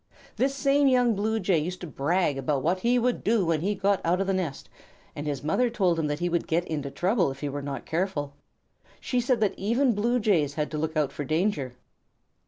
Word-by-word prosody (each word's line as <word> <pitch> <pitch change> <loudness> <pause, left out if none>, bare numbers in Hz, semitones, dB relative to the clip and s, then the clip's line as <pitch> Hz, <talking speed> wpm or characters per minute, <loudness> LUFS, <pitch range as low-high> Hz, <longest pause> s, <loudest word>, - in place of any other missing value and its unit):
This 270 +2 +1
same 275 +1 +3
young 250 -3 +4
Blue 220 +2 0
Jay 185 -4 +2
used 180 +4 -4
to - - -5
brag 155 +2 0
about 135 0 -1
what 180 +4 +1
he 240 +5 +2
would 245 0 0
do 215 -3 +2
when 165 -2 +1
he 205 +4 0
got 200 0 +1
out 175 +2 +1
of 195 - 0
the 195 - 0
nest, 175 -7 -3 0.5
and 145 +1 -5
his 145 -1 -3
mother 240 +11 +1
told 185 -8 +1
him 155 - 0
that 145 0 -1
he 175 +2 -1
would 170 -1 -1
get 170 +2 +1
into 145 -4 -3
trouble 180 - +1
if 135 0 -8
he 145 - -2
were 145 +1 -4
not 140 -1 -5
careful. 160 -5 -2 0.7
She 250 -1 -1
said 245 0 +1
that 210 - +2
even 235 +6 +2
Blue 235 +4 +1
Jays 165 -10 +1
had 150 -1 -2
to 155 - -3
look 160 0 -2
out 145 -3 +1
for 145 - -5
danger. 155 -4 -1
180 Hz, 230 wpm, -26 LUFS, 150-220 Hz, 0.7 s, young